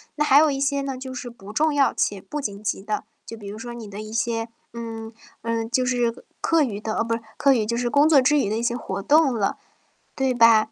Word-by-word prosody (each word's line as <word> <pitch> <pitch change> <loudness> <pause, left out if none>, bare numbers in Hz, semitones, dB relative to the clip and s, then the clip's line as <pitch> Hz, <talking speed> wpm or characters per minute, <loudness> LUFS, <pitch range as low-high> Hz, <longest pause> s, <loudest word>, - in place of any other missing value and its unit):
那 300 - +1
还 280 0 +7
有 310 0 +5
一 275 -1 -2
些 280 0 +1
呢， 275 -1 -4
就 260 0 -7
是 255 -1 -6
不 210 -3 -12
重 310 +6 +2
要 280 -1 +3
且 200 - 0
不 295 +9 -5
紧 205 -5 -5
急 205 - -2
的， 210 +2 -3 0.2
就 230 - -9
比 205 -2 -10
如 205 +2 -7
说 240 +1 -7
你 230 -3 -8
的 205 +1 -7
一 215 0 -8
些 230 0 -1 0.2
嗯， 225 -1 -6 0.3
嗯， 230 -1 -2
就 255 +2 +1
是 245 -2 -1 0.2
课 330 -2 +3
余 210 -6 -3
的 215 0 -3
哦， - - +2
不， 230 0 -1 0.2
课 280 -2 +5
余 220 -4 0
就 235 +1 -1
是 245 0 0
工 285 +5 +4
作 300 -4 +7
之 295 +3 +4
余 205 - 0
的 215 - -1
一 230 - -2
些 235 0 0
活 200 -5 -4
动 300 +2 +5
了， 215 -5 -1 0.6
对 265 -1 0
吧？ 230 -2 +5
235 Hz, 275 characters per minute, -24 LUFS, 220-270 Hz, 0.6 s, 还